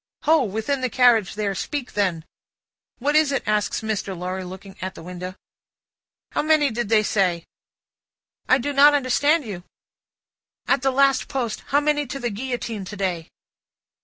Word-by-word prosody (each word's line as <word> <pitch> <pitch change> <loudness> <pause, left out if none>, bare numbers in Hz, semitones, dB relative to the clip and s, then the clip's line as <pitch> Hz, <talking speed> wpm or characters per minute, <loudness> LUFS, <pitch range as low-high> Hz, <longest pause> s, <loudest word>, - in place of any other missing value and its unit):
"Ho! 320 +1 +4
Within 220 +7 -2
the 255 - 0
carriage 235 -6 +3
there. 205 -2 -1
Speak 275 +6 -4
then!" 180 -6 0 0.7
"What 290 +4 0
is 310 -2 +4
it?" 275 - -1
asks 210 -1 0
Mr. 210 -4 -3
Lorry, 185 +2 -4
looking 190 +1 -10
out 185 0 -5
at - - -10
window. 180 +1 -7 1.0
"How - - 0
many 305 -3 +3
did 230 -2 -3
they 220 -1 +4
say?" 180 -5 0 1.0
"I 255 - +6
do 285 +3 -3
not 290 +1 +7
understand 285 +3 +2
you." 190 -5 -7 0.5
" - - -52
At 275 - +2
the 270 - +2
last 275 0 +3
post. 245 -6 -3
How 285 - +3
many 295 -1 +1
to 275 +2 -5
the 240 -3 -2
Guillotine 230 -2 -4
to 210 - -8
day?" 180 -4 -2
230 Hz, 165 wpm, -23 LUFS, 195-275 Hz, 1.0 s, not